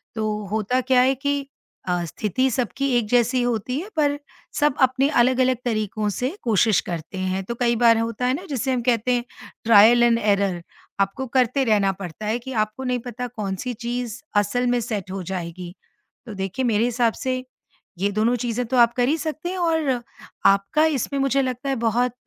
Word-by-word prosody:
तो 215 Hz, -1 st, -2 dB
होता 220 Hz, +4 st, 0 dB
क्या 255 Hz, 0 st, +3 dB
है 260 Hz, +1 st, +4 dB
कि 285 Hz, +1 st, -1 dB, 0.5 s
अ, 175 Hz, -1 st, 0 dB
स्थिति 215 Hz, -, -1 dB
सबकी 255 Hz, +3 st, -1 dB
एक 230 Hz, -3 st, 0 dB
जैसी 245 Hz, +1 st, +2 dB
होती 245 Hz, +1 st, -1 dB
है, 380 Hz, +6 st, -7 dB
पर 290 Hz, -1 st, +2 dB, 0.4 s
सब 295 Hz, -2 st, +2 dB
अपने 260 Hz, +1 st, +3 dB
अलग-अलग 255 Hz, -1 st, +3 dB
तरीकों 215 Hz, -2 st, -1 dB
से 250 Hz, +5 st, -2 dB
कोशिश 220 Hz, -2 st, +3 dB
करते 170 Hz, +2 st, -5 dB
हैं। 185 Hz, +1 st, -2 dB
तो 235 Hz, +4 st, -4 dB
कई 235 Hz, 0 st, +1 dB
बार 230 Hz, -1 st, +5 dB
होता 230 Hz, +2 st, -2 dB
है 255 Hz, -, +2 dB
ना 360 Hz, +6 st, -7 dB
जिसे 265 Hz, -1 st, -1 dB
हम 245 Hz, -, 0 dB
कहते 240 Hz, 0 st, +1 dB
हैं 240 Hz, -1 st, 0 dB, 0.4 s
ट्रायल 230 Hz, +2 st, +7 dB
एंड 235 Hz, -1 st, +4 dB
एरर 200 Hz, -4 st, +1 dB, 0.4 s
आपको 195 Hz, +7 st, -1 dB
करते 260 Hz, +2 st, +2 dB
रहना 205 Hz, -4 st, +3 dB
पड़ता 180 Hz, +3 st, -7 dB
है 225 Hz, +3 st, 0 dB
कि 265 Hz, +2 st, -8 dB
आपको 215 Hz, +5 st, -8 dB
नहीं 250 Hz, -1 st, -1 dB
पता 245 Hz, +1 st, -5 dB
कौन-सी 215 Hz, 0 st, -4 dB
चीज़ 240 Hz, 0 st, -4 dB, 0.2 s
असल 245 Hz, +5 st, +1 dB
में 245 Hz, 0 st, +2 dB
सेट 205 Hz, -4 st, -4 dB
हो 195 Hz, 0 st, -4 dB
जाएगी। 175 Hz, -1 st, -6 dB, 0.5 s
तो 225 Hz, -, -8 dB
देखिए 195 Hz, +6 st, -3 dB
मेरे 225 Hz, -1 st, +2 dB
हिसाब 240 Hz, -1 st, +1 dB
से 255 Hz, -1 st, -1 dB, 0.6 s
ये 200 Hz, +1 st, +1 dB
दोनों 220 Hz, +4 st, +1 dB
चीज़ें 245 Hz, 0 st, -2 dB
तो 255 Hz, +2 st, 0 dB
आप 235 Hz, -1 st, +5 dB
कर 245 Hz, 0 st, +2 dB
ही 315 Hz, -, +2 dB
सकते 315 Hz, +2 st, -4 dB
हैं 375 Hz, -, -4 dB
और 320 Hz, -8 st, 0 dB, 0.4 s
आपका 200 Hz, +11 st, +4 dB
इसमें 280 Hz, -2 st, -1 dB
मुझे 275 Hz, 0 st, +2 dB
लगता 255 Hz, +2 st, -3 dB
है 270 Hz, -, +1 dB
बहुत 240 Hz, +2 st, +1 dB
240 Hz, 190 wpm, -23 LUFS, 210-255 Hz, 0.6 s, ट्रायल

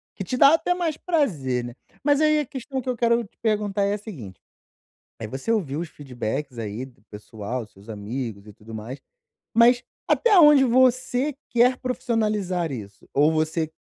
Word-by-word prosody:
que 195 Hz, -, -5 dB
te 250 Hz, +8 st, -3 dB
dá 280 Hz, +4 st, +7 dB
até 355 Hz, +2 st, +2 dB
mais 335 Hz, -4 st, -2 dB
prazer, 160 Hz, -, 0 dB
né. 120 Hz, -, -7 dB, 0.3 s
Mas 290 Hz, 0 st, +3 dB
aí 305 Hz, 0 st, +4 dB
a 295 Hz, -, -1 dB
questão 265 Hz, +1 st, -5 dB
que 255 Hz, -, -5 dB
eu 250 Hz, -, -1 dB
quero 235 Hz, 0 st, +2 dB
te 205 Hz, -, -18 dB
perguntar 210 Hz, -2 st, 0 dB
é 200 Hz, +1 st, +1 dB
a -, -, -1 dB
seguinte, 140 Hz, -, -10 dB, 0.8 s
aí 110 Hz, -, -5 dB
você 130 Hz, -, -3 dB
ouviu 160 Hz, -9 st, -1 dB
os 170 Hz, -2 st, -5 dB
feedbacks 130 Hz, 0 st, -5 dB
aí 110 Hz, +2 st, -4 dB
do 130 Hz, -1 st, -19 dB
pessoal, 110 Hz, +2 st, -6 dB
seus 100 Hz, +1 st, -20 dB
amigos 110 Hz, 0 st, -5 dB
e 105 Hz, -, -12 dB
tudo 110 Hz, +2 st, -13 dB
mais. 115 Hz, +6 st, -7 dB, 0.6 s
Mas, 240 Hz, +2 st, +5 dB, 0.2 s
até 435 Hz, -5 st, +4 dB
onde 295 Hz, -4 st, +8 dB
você 255 Hz, +2 st, +2 dB
quer 250 Hz, +2 st, +3 dB
profissionalizar 210 Hz, -, -1 dB
isso? 105 Hz, -6 st, -9 dB
Ou 150 Hz, +3 st, +4 dB
você 160 Hz, 0 st, -1 dB
190 Hz, 180 wpm, -24 LUFS, -, 0.8 s, onde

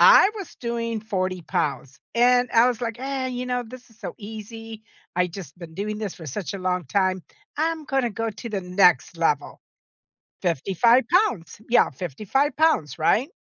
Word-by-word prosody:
I 390 Hz, -, +8 dB
was 390 Hz, -6 st, -7 dB
doing 230 Hz, -2 st, -2 dB
40 185 Hz, -4 st, -2 dB
pounds, 135 Hz, -3 st, -2 dB, 0.2 s
and 245 Hz, +1 st, +4 dB
I 230 Hz, +2 st, +6 dB
was 245 Hz, -3 st, -2 dB
like, 235 Hz, -1 st, -3 dB
"Eh, 270 Hz, -1 st, -2 dB
you 250 Hz, 0 st, -4 dB
know, 250 Hz, 0 st, -1 dB
this 250 Hz, +2 st, -12 dB
is 225 Hz, -, -23 dB
so -, -, -6 dB
easy. 220 Hz, +1 st, -8 dB, 0.3 s
I 180 Hz, 0 st, +3 dB
just 175 Hz, -3 st, -9 dB
been 170 Hz, -2 st, -10 dB
doing 210 Hz, +3 st, -3 dB
this 210 Hz, -4 st, -4 dB
for 160 Hz, -, -10 dB
such 180 Hz, +8 st, -4 dB
a -, -, -4 dB
long 180 Hz, -2 st, -1 dB
time. 185 Hz, +5 st, +1 dB, 0.3 s
I'm 320 Hz, 0 st, -1 dB
gonna 270 Hz, -3 st, 0 dB
go 225 Hz, +2 st, -2 dB
to 215 Hz, +3 st, -8 dB
the 205 Hz, -3 st, -2 dB
next 180 Hz, -4 st, +3 dB
level. 150 Hz, -3 st, 0 dB, 0.8 s
55 195 Hz, -, +3 dB
pounds." 350 Hz, -, +1 dB
Yeah, 240 Hz, -, +4 dB
55 185 Hz, -, -1 dB
pounds. 315 Hz, -, +2 dB
Right? 225 Hz, -, +3 dB
215 Hz, 175 wpm, -24 LUFS, 180-245 Hz, 0.8 s, I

